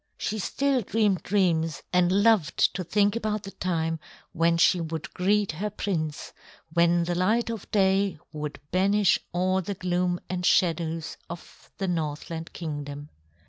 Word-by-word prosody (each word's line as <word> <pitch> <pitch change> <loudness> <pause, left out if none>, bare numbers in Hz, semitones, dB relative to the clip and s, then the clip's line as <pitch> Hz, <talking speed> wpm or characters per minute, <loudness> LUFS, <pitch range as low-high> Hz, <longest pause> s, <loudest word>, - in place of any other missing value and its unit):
She 215 - -2
still 275 +5 +1
dreamed 210 -3 +1
dreams 170 -5 +1
and 180 0 +4
loved 210 -8 +3
to 185 - -3
think 205 +4 +2
about 215 -2 -2
the 195 - -7
time 165 -4 -1 0.3
when 165 +1 +2
she 175 +1 +4
would 160 -2 -5
greet 205 +1 +2
her 190 +7 -3
prince; 165 -7 -3 0.4
when 170 0 +4
the 175 +1 -1
light 215 +7 +1
of 225 -4 -7
day 195 -2 +2 0.2
would 150 -1 -5
banish 200 +2 +3
all 185 +2 +1
the 200 +3 -4
gloom 180 -1 0
and 180 0 -3
shadows 165 -3 +1
of 170 -1 -11
the 195 - -2
Northland 160 -1 -3
Kingdom. 145 -2 -6
180 Hz, 145 wpm, -26 LUFS, 165-200 Hz, 0.4 s, and